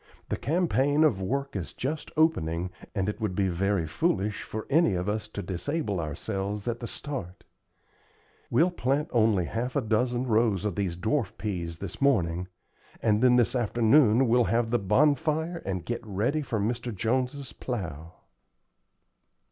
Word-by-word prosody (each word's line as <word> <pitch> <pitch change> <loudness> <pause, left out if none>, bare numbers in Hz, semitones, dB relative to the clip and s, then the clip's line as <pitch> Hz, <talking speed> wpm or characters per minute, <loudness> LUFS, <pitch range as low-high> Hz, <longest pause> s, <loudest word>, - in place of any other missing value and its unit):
The - - 0
campaign 150 -3 +2
of 115 -12 +3
work 140 +7 -2
is 90 -5 -4
just 150 +4 -3
opening, 90 - +1 0.2
and 95 -1 0
it 105 +2 -3
would 105 -4 -1
be 95 -1 +1
very 95 0 0
foolish 105 - 0
for 110 0 -6
any 145 - +3
of 90 +2 -2
us 105 +1 -2
to 105 -1 -6
disable 105 - -2
ourselves 100 +6 -3
at 120 0 -1
the 120 - -5
start. 115 - -6 1.1
We'll 175 +3 +3
plant 145 -1 0
only 110 -6 +3
half 120 +7 -3
a 140 - +2
dozen 120 +2 0
rows 110 -4 +2
of 105 - 0
these 90 -2 -2
dwarf 110 +2 -1
peas 85 -6 -3
this - - -7
morning, 90 -10 +2 0.5
and 105 -1 +2
then 125 -1 +6
this 125 +1 +3
afternoon 120 +1 +4
we'll 120 +1 +4
have 115 0 +1
the 120 - +3
bonfire 155 - +2
and 95 -3 -3
get 120 0 -3
ready 110 +9 -1
for 120 -6 -2
Mr. 120 +3 -2
Jones's 125 +6 -1
plow." 85 - -5
110 Hz, 155 wpm, -28 LUFS, 95-135 Hz, 1.1 s, then